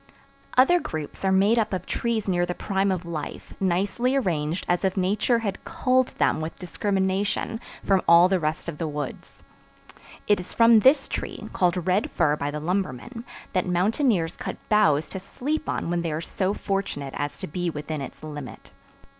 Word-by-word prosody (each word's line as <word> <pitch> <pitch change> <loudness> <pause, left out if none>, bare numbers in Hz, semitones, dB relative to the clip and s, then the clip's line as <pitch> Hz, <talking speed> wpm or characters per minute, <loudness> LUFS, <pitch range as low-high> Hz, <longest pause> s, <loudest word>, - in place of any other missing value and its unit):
Other 310 +8 +6
groups 155 - -6
are 190 - +2
made 200 +5 +4
up 215 -2 0
of 185 -1 -2
trees 230 -3 -1
near 175 -2 +2
the 175 0 -2
prime 195 -1 0
of 180 -2 -2
life, 160 -3 -6
nicely 195 +8 +1
arranged 170 - -1
as 175 +1 +1
if 190 0 0
Nature 205 +6 +2
had 195 -1 -3
culled 255 -1 +2
them - - +2
with 160 +1 -5
discrimination 195 +3 -1 0.3
from 195 -2 +3
all 170 +1 +8
the 185 0 +1
rest 155 0 -2
of 165 -3 -5
the 165 - -1
woods. 145 -2 -6 0.8
It 205 -2 +3
is 180 - -9
from 230 -1 +7
this 270 +5 +5
tree, - - -5
called 180 -1 +1
Red 190 +3 +1
Fir 150 -1 +2
by 145 -1 -3
the 150 +1 -4
lumbermen, 185 - -3 0.3
that 185 -1 +1
mountaineers 185 - +1
cut - - -5
boughs 160 -9 +4
to 190 - -5
sleep 290 +10 -3
on 170 - -2
when 175 0 0
they 165 -2 -2
are 150 - -2
so 190 +4 -2
fortunate 195 -9 -3
as 145 0 -3
to - - -5
be 175 +3 -2
within 150 -1 -4
its 140 - -8
limit. 145 -6 -8
185 Hz, 180 wpm, -25 LUFS, 160-210 Hz, 0.8 s, all